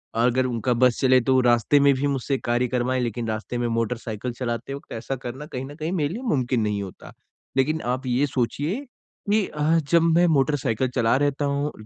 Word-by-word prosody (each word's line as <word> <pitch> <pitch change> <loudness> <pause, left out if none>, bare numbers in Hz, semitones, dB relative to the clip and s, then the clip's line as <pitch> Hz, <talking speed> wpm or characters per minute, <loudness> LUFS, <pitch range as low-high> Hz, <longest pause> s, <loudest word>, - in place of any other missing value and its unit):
अगर 125 +2 +2
उनका 120 0 0
बस 125 0 +3
चले 130 -1 +5
तो 130 +2 +3
रास्ते 120 +3 +3
में 140 -1 +5
भी 140 +2 0
मुझसे 135 0 -1
कार्य 120 +1 0
करवाएँ, 125 +1 0
लेकिन 120 -1 -3
रास्ते 110 +2 -3
में 120 - 0
मोटरसाइकिल 115 0 -2
चलाते 120 +1 -3
वक़्त 140 - -10
ऐसा 120 +4 -4
करना 130 +4 -6
कहीं 130 -3 -5
ना 145 - -10
कहीं 155 +2 -4
मेरे 155 -3 0
लिए 235 - -5
मुमकिन 130 - 0
नहीं 105 -1 -1
होता। 95 - -11 0.4
लेकिन 155 +4 +1
आप 130 +1 -5
ये 125 +4 +2
सोचिए 145 - -2 0.5
कि 215 -1 +3
अ, 150 -1 -4 0.3
जब 170 -1 +6
मैं 175 - +5
मोटरसाइकिल 135 -5 +1
चला 115 -1 +3
रहता 145 0 0
हूँ 140 +1 -1
130 Hz, 195 wpm, -24 LUFS, 120-145 Hz, 0.5 s, जब